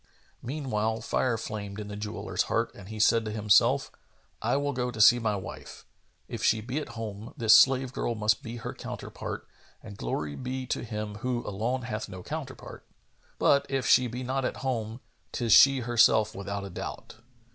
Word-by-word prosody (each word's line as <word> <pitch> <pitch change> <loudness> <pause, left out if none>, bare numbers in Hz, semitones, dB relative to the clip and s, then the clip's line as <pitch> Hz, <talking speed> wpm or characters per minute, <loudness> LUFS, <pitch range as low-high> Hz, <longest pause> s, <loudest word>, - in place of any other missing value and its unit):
Meanwhile, 115 -5 -2
fire 125 -3 0
flamed 105 -2 -6
in 105 - -6
the 105 - -6
jeweller's 105 +1 -3
heart - - 0
and 95 - -12
he 110 0 -7
said 115 +2 +4
to - - -3
himself, 105 -2 +3 0.5
"I - - +1
will 145 0 -1
go 125 -1 -2
see 110 +3 +6
my 110 -3 0
wife. 95 - -8 0.4
If - - -6
she 110 - +3
be 125 +7 -3
at 120 -6 -8
home, 110 0 -7
this 110 -2 +5
slave 130 +2 +5
girl 120 - -2
must 110 +3 +1
be 115 -3 -7
her 115 - -6
counterpart, - - -7 0.4
and 100 -2 -10
glory 70 +4 -3
be 130 0 -4
to - - -2
Him 105 -2 -5
who 125 0 -2
alone 115 +6 -2
hath 110 -3 -4
no 95 -1 -9
counterpart! 145 - -7 0.5
But, 140 0 +3
if 135 -2 -1
she 125 - +5
be 125 +2 -5
not 130 +2 -1
at - - -2
home, 115 -2 -2 0.3
'tis 115 -3 +2
she 135 +2 +7
herself 110 -2 +4
without 100 0 -5
a 100 - -8
doubt." 90 - -7
115 Hz, 180 wpm, -28 LUFS, 105-125 Hz, 0.5 s, she